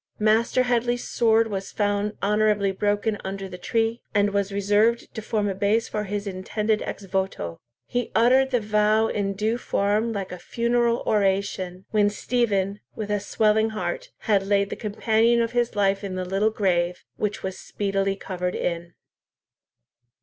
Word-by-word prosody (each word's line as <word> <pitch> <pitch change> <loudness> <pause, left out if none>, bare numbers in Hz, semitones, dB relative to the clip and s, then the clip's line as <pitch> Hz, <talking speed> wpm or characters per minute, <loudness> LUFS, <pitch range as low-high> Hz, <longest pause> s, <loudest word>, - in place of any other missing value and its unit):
Master 220 +4 +3
Headley's 240 0 0
sword 225 -1 +3
was 195 -2 -4
found 205 0 0
honourably 210 -1 +2
broken 205 +2 0
under 195 0 -4
the 180 -1 -9
tree, 225 +4 0
and 205 0 +3
was 200 0 0
reserved 205 +4 +2
to 220 - -5
form 215 -1 -1
a 195 - 0
base 205 +4 +1
for 210 0 -3
his 205 +1 -3
intended 210 +3 -1
ex 200 - -5
voto. 190 - -3 0.3
He 245 -1 -2
uttered 260 +4 +5
the 250 -2 +2
vow 215 +1 +2
in 200 -1 -1
due 215 +4 -1
form 210 +1 0
like 200 -3 -4
a 180 - -7
funeral 235 +3 +1
oration, 190 -2 0
when 210 -1 +3
Stephen, 205 -3 0 0.2
with 210 -1 -4
a 205 - +1
swelling 220 +2 +2
heart, - - -3
had 205 -4 +2
laid 200 0 +1
the - - -2
companion 225 +2 +2
of 230 0 0
his 240 -2 0
life 195 0 +1
in 190 -2 -4
the 185 0 -3
little 195 +4 +1
grave, 180 -4 0
which 210 -1 -2
was 190 0 -4
speedily 195 -1 -1
covered 180 -2 -4
in. 170 0 -3
205 Hz, 165 wpm, -24 LUFS, 195-225 Hz, 0.3 s, uttered